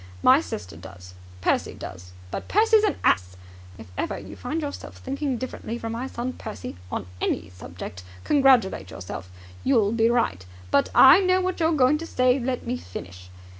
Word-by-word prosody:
My - - +7
sister 90 -1 -7
does. 90 +2 -12 0.3
Percy - - 0
does. 90 -1 -9 0.2
But - - -5
Percy's 440 +1 +4
an 420 - +2
ass! 90 0 +2 0.4
If 110 -3 -12
ever - - -2
you 100 -1 -9
find 295 +6 -3
yourself 285 -1 -6
thinking 270 -1 -3
differently 235 -2 -5
from 225 -1 -5
my 240 +3 -3
son 255 0 -4
Percy, 95 - -7 0.2
on - - -3 0.2
any - - -1
subject, 90 0 -9 0.2
congratulate 255 - +3
yourself. 90 0 -7 0.3
You'll 225 -6 +3
be 230 0 +3
right." 230 - +1 0.3
"But.. 140 - +3
." - - -17 0.2
"I 340 - +6
know 370 -1 +3
what 370 -1 -2
you're 325 0 +3
going 290 +1 +3
to 330 - -6
say. 255 -1 +2
Let 250 0 -3
me 245 +1 -2
finish. 90 - -9
235 Hz, 175 wpm, -25 LUFS, -, 0.4 s, My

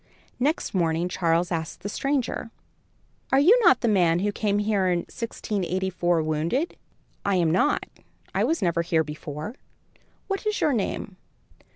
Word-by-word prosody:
Next 290 +6 0
morning, 170 -2 +1
Charles 170 0 +1
asked 165 -1 -3
the - - -4
stranger: 260 +1 -1 0.8
"Are 270 - +5
you 350 +11 +7
not 350 - +6
the 235 - +1
man 175 -6 +3
who 205 +3 0
came 205 -1 0
here 205 -2 +1
in 175 -1 +1
1684, 185 -6 -1
wounded?" 160 - -1 0.5
"I 200 -1 +1
am 170 -3 +2
not. 195 - +2 0.5
I - - +1
was 325 -9 0
never 170 -1 +2
here 165 -1 +1
before. 150 +4 -6 0.7
What 395 +2 -3
is 425 - 0
your 300 - +2
name?" 205 -3 -3
190 Hz, 150 wpm, -25 LUFS, 170-235 Hz, 0.8 s, you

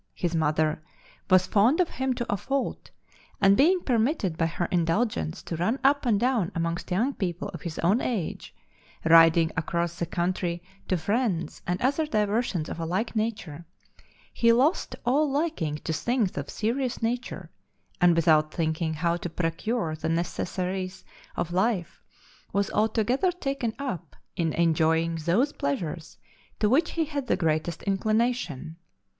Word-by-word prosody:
His 175 -1 -2
mother, 155 -1 +1 0.5
was 185 0 +5
fond 220 - +3
of 360 - +3
him 265 -1 -1
to 240 - -3
a - - 0
fault, 270 +7 -3 0.5
and 195 -1 +5
being 350 - +4
permitted 230 - +1
by 165 0 +1
her 170 +1 -2
indulgence 170 - 0
to 170 - -4
run 180 +10 0
up 280 -1 +3
and 210 -4 +3
down 235 -7 +1
amongst 170 0 -2
young 230 +10 +1
people 180 -5 -3
of - - -8
his 170 -3 -6
own 195 +8 +2
age, 210 -10 -3 0.5
riding 165 0 +6
across 170 +1 -2
the 170 - -1
country 175 0 -2 0.2
to 185 - +1
friends 200 0 -1
and 180 +1 0
other 285 +4 +1
diversions 210 - 0
of - - -6
a 165 - -2
like 205 +8 -2
nature, 205 -8 -3 0.7
he 230 -1 +4
lost 265 +9 +2
all 285 +5 +3
liking 275 - -1
to 160 +1 -4
things 235 - 0
of 140 0 -4
a - - -14
serious 245 +2 -2
nature, 240 +2 -3 0.5
and 175 -1 +6
without 155 -2 +3
thinking 160 -1 -1
how 170 +2 0
to 175 - -5
procure 165 +2 -2
the 155 +1 -3
necessaries 185 +2 -3 0.3
of 175 0 -3
life, 190 -1 0 0.5
was 200 0 0
altogether 225 - +1
taken 275 -9 -2
up 260 - -5 0.2
in 165 -3 0
enjoying 165 0 +2
those 235 - +2
pleasures 155 +3 -3 0.4
to 210 - +3
which 290 +9 +2
he 330 -1 0
had 285 -3 -4
the - - +2
greatest 160 -1 -1
inclination. 205 - -1
185 Hz, 155 wpm, -26 LUFS, 165-240 Hz, 0.7 s, riding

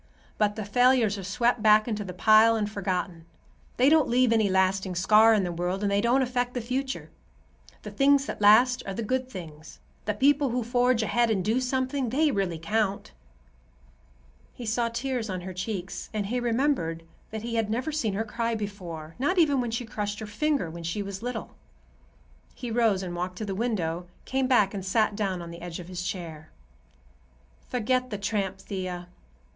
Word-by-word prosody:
But 210 -1 +2
the 215 - -4
failures 235 -1 +3
are - - -6
swept 235 +5 +1
back 215 +1 +5
into 215 -3 -2
the 185 - -6
pile 215 +5 +5
and 215 -2 0
forgotten. 185 -4 -3 0.5
They 255 - +4
don't 310 0 +5
leave 245 -1 +3
any 220 -3 +3
lasting 190 0 +1
scar 215 +5 +5
in 205 - +1
the 175 - -2
world, 180 +3 -2
and 200 - +1
they 200 0 +2
don't 245 +4 +3
affect 245 0 -2
the - - 0
future. 260 +3 -3 0.7
The - - -7
things 275 0 +3
that - - -6
last 240 +5 +6
are 195 - -4
the 230 - -3
good 255 +3 -1
things. 160 -7 -10 0.3
The 210 0 -1
people 280 +3 +3
who 245 0 -1
forge 245 0 +2
ahead 235 +2 +2
and 195 -5 0
do 230 +4 +1
something, 260 0 -1
they 295 +5 +2
really 190 -7 -1
count." 200 - -1 1.4
He 245 - -7
saw 230 +2 0
tears 235 -1 -3
on 185 -1 -3
her 185 +1 -7
cheeks, 190 0 -5
and 210 -2 -1
he 245 +5 -1
remembered 235 - 0 0.3
that 220 0 -6
he 235 0 -4
had 225 -2 0
never 250 +7 -1
seen 225 -10 -1
her 220 +3 -1
cry 230 +1 -2
before, 180 -7 -6
not 355 +9 +1
even 290 -6 +4
when 240 - -2
she 235 +2 -3
crushed 210 -2 -4
her 220 - -6
finger 275 - 0
when 170 +1 -8
she 170 +5 -3
was 195 0 -6
little. 245 -1 -5 1.0
He 245 -2 -6
rose 220 -5 +2
and 175 -1 -5
walked 180 +1 -4
to 215 - -4
the 195 - -3
window, 180 -6 -2 0.2
came 265 0 0
back 215 -6 +3
and 195 -2 -4
sat 210 +2 +1
down 190 -4 -2
on 170 - -8
the 170 0 -10
edge 175 0 -6
of 175 0 -9
his 180 -1 -5
chair. 165 -4 -6 1.2
"Forget 255 +1 0
the 210 - -4
tramp, 200 -1 -2
Thea. 185 -2 -5
215 Hz, 195 wpm, -27 LUFS, 190-245 Hz, 1.4 s, last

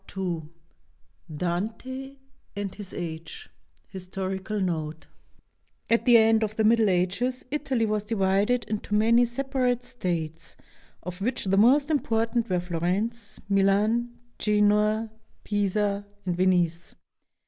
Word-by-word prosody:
II 170 -5 -3 0.9
DANTE 225 - -4 0.4
AND 200 -2 -4
HIS 205 -3 -9
AGE 170 - -7 0.4
HISTORICAL 190 +2 -4
NOTE 160 -4 -3 0.9
At 230 - +3
the 240 -2 +8
end 225 0 +4
of 215 0 -3
the 220 - +1
Middle 220 -1 +4
Ages 195 +8 0
Italy 275 -6 0
was 210 -1 -1
divided 210 +3 +1
into 210 -1 -3
many 230 +3 +5
separate 250 0 -1
states, 170 -9 -4 0.5
of 180 +1 -7
which 240 +2 -1
the 195 0 +2
most 275 +8 +5
important 230 -4 0
were 180 -1 +1
Florence, 185 +6 -2
Milan, 210 +5 +2 0.2
Genoa, 210 +1 +2 0.3
Pisa, 205 0 0 0.2
and 180 -2 -1
Venice. 175 -2 +1
210 Hz, 115 wpm, -26 LUFS, 185-235 Hz, 0.9 s, the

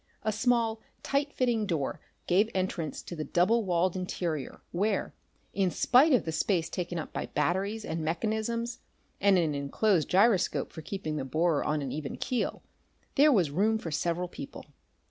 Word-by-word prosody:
A 215 - +1
small, 225 0 +1 0.2
tight 280 +1 0
fitting 235 -6 0
door 160 -7 -1 0.3
gave 200 +5 +3
entrance 185 -4 -2
to 175 - -7
the 155 - -3
double 205 +9 +2
walled 180 0 +1
interior, 175 -6 -3
where, 200 +3 0 0.4
in 195 -2 +2
spite 255 - +4
of 250 -8 +3
the 160 - -2
space 165 0 0
taken 175 -1 -3
up 155 - -5
by - - -3
batteries 195 +8 -1
and 160 0 -3
mechanisms 220 +7 -2 0.4
and 200 -1 +5
an 160 -4 +1
enclosed 155 +6 +1
gyroscope 195 0 +3
for 160 - -7
keeping 155 -2 -4
the 140 - -2
borer 155 +3 +1
on 150 -1 0
an 135 - -4
even 150 -2 -4
keel, 250 - -2 0.5
there 295 +1 +6
was 180 - +3
room 210 +8 +2
for 170 -7 -6
several 170 +3 -1
people. 280 +10 -9
185 Hz, 165 wpm, -29 LUFS, 160-220 Hz, 0.5 s, there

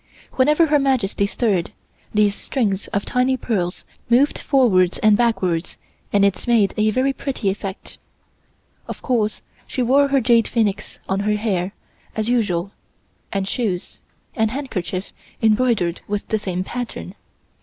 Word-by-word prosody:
Whenever 300 +5 +4
Her 300 -1 +3
Majesty 240 -7 +1
stirred, 200 -6 0 0.4
these 210 -1 +3
strings 205 -4 -2
of 200 - -2
tiny 255 +1 +1
pearls 185 -8 -2 0.2
moved 260 +5 +3
forwards 200 -10 +3
and 215 -1 +4
backwards 190 -7 0 0.3
and 200 -1 +4
it 200 +4 -1
made 225 -5 +3
a 215 0 +2
very 260 +5 +1
pretty 260 -8 -2
effect. 195 -1 -7 0.9
Of - - -7
course, 225 -5 0 0.2
she 255 - -1
wore 275 +4 +4
her 275 0 +3
jade 230 -2 +3
phoenix 215 -4 -1
on 190 +1 0
her 210 +1 +1
hair 200 -3 -1 0.4
as 215 0 -1
usual 200 -6 0 0.6
and 195 -1 -1
shoes 195 -6 -2 0.4
and 220 -2 +2
handkerchief 200 - -4 0.3
embroidered 220 -6 +2
with 205 0 -3
the 220 - +1
same 185 -3 -2
pattern. 240 -4 -6
215 Hz, 140 wpm, -21 LUFS, 195-250 Hz, 0.9 s, Whenever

